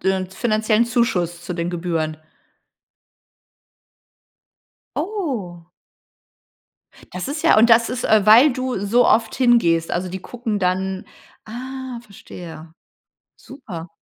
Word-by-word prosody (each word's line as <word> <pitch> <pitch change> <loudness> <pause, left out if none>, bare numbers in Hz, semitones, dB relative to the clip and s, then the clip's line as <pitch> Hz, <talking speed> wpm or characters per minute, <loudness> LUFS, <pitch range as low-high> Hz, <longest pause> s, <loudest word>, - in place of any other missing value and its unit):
d 190 +1 +1
'n 185 -1 -3
finanziellen 215 +1 +1
Zuschuss 180 -8 -1
zu 180 - -5
den 170 0 -3
Gebühren. 165 -3 -2 2.8
Oh. 230 - -4 1.4
Das 180 - -5
ist 295 +3 -4
ja 325 -9 +5
und 230 +2 +5
das 230 0 +5
ist, 250 -1 -4
äh, 215 -2 +3
weil 240 +7 +7
du 255 -2 -3
so 235 +4 +3
oft 225 0 +2
hingehst? 200 -10 +2
Also 180 +1 -2
die 190 +1 -6
gucken 230 0 -4
dann 190 +1 -1 0.4
ah, 255 +2 -7
verstehe. 170 -6 -11 0.6
Super. 185 - -10
215 Hz, 115 wpm, -21 LUFS, 180-245 Hz, 2.8 s, weil